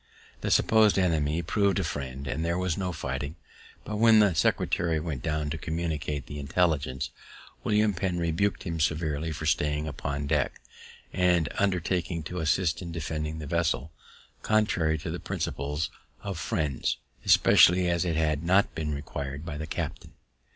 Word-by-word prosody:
The - - -1
suppos'd 110 -2 +4
enemy 80 -3 +1
prov'd 100 +4 +1
a 95 - +1
friend, 70 -3 -4
so - - -2
there 85 +2 0
was 90 -3 0
no 95 -2 -2
fighting; 70 -1 -4 0.5
but 105 - -3
when 110 0 +6
the 105 -4 +5
secretary 80 +1 +1
went 75 -5 -4
down 75 0 -1
to 80 - -3
communicate 80 -4 -3
the 75 - -7
intelligence, 70 -3 0 0.5
William 105 0 +2
Penn 90 0 -1
rebuk'd 85 +4 0
him 85 -2 -3
severely 80 0 0
for 80 +1 -5
staying 75 0 +1
upon 70 0 -3
deck, 70 - 0 0.5
and 90 -4 +3
undertaking 90 -4 0
to 90 +3 -5
assist 80 +2 +1
in 85 -2 -6
defending 80 -1 -3
the 80 - -6
vessel, 75 -2 0 0.5
contrary 95 -8 +2
to - - -5
the - - -4
principles 75 +3 -3 0.3
of 100 -4 -4
Friends, 75 - -1 0.3
especially 90 +1 +6
as 85 0 +1
it 85 -3 -1
had 75 -2 +1
not 95 +4 +3
been 75 -2 -2
required 70 +1 -5
by 80 -3 -5
the 80 +1 -5
captain. - - -5
80 Hz, 160 wpm, -28 LUFS, 75-90 Hz, 0.5 s, when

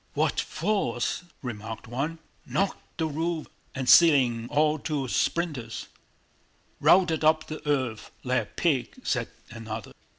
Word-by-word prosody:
"What - - +1
force!" 175 - -1 0.2
remarked 110 -2 -6
one. 140 +8 -2 0.3
"Knocked 195 0 -2
the 160 - 0
roof 160 +1 -2 0.3
and 130 -1 -3
ceiling 125 -6 +6
all 150 +1 +2
to 140 -3 -2
splinters!" 135 -6 -1 0.9
"Routed 175 -4 +4
up 155 0 +4
the 155 - -7
earth 130 -6 -1
like 125 0 +1
a - - -7
pig," 140 -8 -1
said 125 -3 0 0.2
another. 110 -1 -6
145 Hz, 125 wpm, -27 LUFS, 120-160 Hz, 0.9 s, ceiling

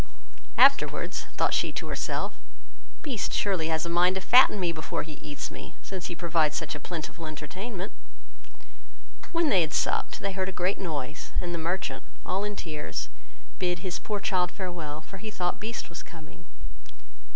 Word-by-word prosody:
Afterwards, - - +5
thought - - +3
she - - +2
to - - -3
herself, - - -1 0.7
"Beast 260 -9 -1
surely 185 -6 +2
has 160 0 +1
a - - -2
mind 175 +2 +4
to 190 - -1
fatten 245 +1 +7
me 175 -2 +2
before 155 -2 -2
he 155 - -8
eats 145 -1 -4
me, - - -9
since 190 -2 -4
he 175 - -4
provides 165 -3 +2
such - - -2
a 145 - -5
plentiful 165 +1 -5
entertainment." 185 +7 -5 1.4
When 335 -2 +3
they 185 - +6
had 160 -1 0
supped, - - +1
they 200 - -1
heard 190 0 -1
a 190 - -8
great 185 +3 +2
noise, 150 -4 -4
and 175 -1 -1
the 170 - -1
merchant, 175 +4 -1 0.2
all 190 +2 0
in 205 0 -2
tears, 150 - -3 0.5
bid 180 -1 0
his 185 -1 -1
poor 210 -2 -2
child 185 -3 +2
farewell, 170 -6 -4
for 195 - -10
he 220 - -5
thought 180 -4 -1
Beast 225 +3 -3
was 170 - -7
coming. 155 - -12
175 Hz, 175 wpm, -29 LUFS, 160-195 Hz, 1.4 s, fatten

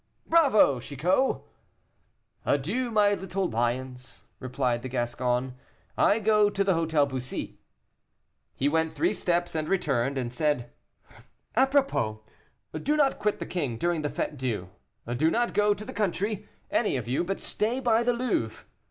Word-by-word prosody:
"Bravo, 270 - +4
Chicot!" 175 - 0 1.0
"Adieu, 200 - 0
my 210 -2 +4
little 190 -1 -2
lions," 125 +2 -3 0.2
replied 125 -2 -1
the 130 - -6
Gascon, 125 +1 -1 0.4
"I 205 - +4
go 210 -1 +4
to 200 -1 0
the 195 - +2
Hôtel 160 -3 +2
Bussy." 130 -2 -5 1.0
He 135 - 0
went 160 +2 +1
three 345 - +1
steps 175 0 0
and 155 -1 -2
returned, 140 -8 0
and 120 -2 -3
said, 125 -4 0 0.8
"Apropos, 265 - +2 0.6
do 300 +2 +1
not 280 -3 +2
quit 210 -1 0
the - - -5
king 140 -10 -2
during 170 +3 0
the 150 - -1
Fête 150 - -3
Dieu; 115 -9 -3 0.5
do 155 +5 +3
not 240 +7 0
go 210 0 +3
to 210 - -9
the 260 - -7
country, 205 +1 -2 0.2
any 210 - +1
of 120 -3 -5
you, 130 +7 0
but 195 +2 -3
stay 230 +5 -1
by 235 -3 +3
the 245 +1 +2
Louvre. 235 - -2
165 Hz, 150 wpm, -27 LUFS, 130-210 Hz, 1.0 s, Bravo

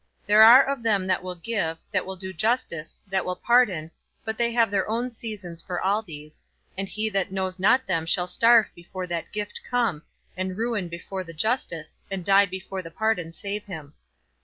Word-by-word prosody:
There 210 +1 +6
are 245 +5 +10
of 275 -2 -2
them 210 -5 +2
that 185 - +1
will 180 0 -6
give, 175 -4 -2
that - - 0
will 190 - -4
do 190 0 -6
justice, 175 -5 -1
that 190 -2 -1
will 180 - -2
pardon, 200 -11 +2 0.3
but 220 0 -2
they 235 +1 +1
have 230 -3 +3
their 195 0 0
own 240 +3 -1
seasons 205 -8 -7
for 180 -1 -4
all 200 +3 +1
these, 155 -6 -11 0.3
and 195 0 -4
he 215 +1 -1
that 195 -1 0
knows 190 -1 -3
not 250 +7 +4
them 165 -4 -1
shall 180 +2 +2
starve 230 +5 +4
before 185 +2 -7
that 170 -2 -4
gift 210 0 -4
come, 235 -11 0 0.3
and 185 0 -3
ruin 225 -5 -1
before 175 +3 -6
the 165 -2 -10
justice, 165 -4 -2
and 190 -3 -4
die 200 0 +5
before 190 0 -6
the 165 - -9
pardon 180 -2 -1
save 200 +5 -5
him. 155 -7 -8
190 Hz, 195 wpm, -25 LUFS, 175-220 Hz, 0.3 s, are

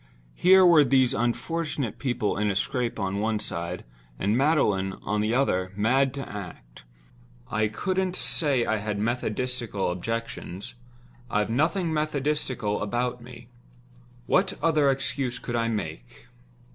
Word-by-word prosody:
Here 190 +1 +6
were 165 -4 +7
these 130 -2 +3
unfortunate 120 0 -2
people 120 -6 -1
in 105 +1 0
a 100 - -1
scrape 125 +1 -1
on 100 0 -1
one 110 +1 0
side; 85 -3 -4 0.3
and 100 +3 +1
Magdalen, 120 -10 +2
on 105 +1 0
the 110 +3 +1
other, 95 -9 +1
mad 130 +6 +2
to 135 - -5
act. 60 -13 -9 0.7
I 110 -1 +2
couldn't 185 - -1
say 140 -11 +1
I 110 - +1
had 105 0 -3
methodistical 115 -2 -1
objections—I've 115 +3 -5
nothing 160 - +1
methodistical 145 -7 -1
about 120 +3 -1
me. 120 0 -12 0.8
What 190 +6 +2
other 155 -4 +3
excuse 135 -1 -1
could 120 - -5
I 115 -1 +1
make? 115 +4 -5
120 Hz, 130 wpm, -26 LUFS, 105-135 Hz, 0.8 s, were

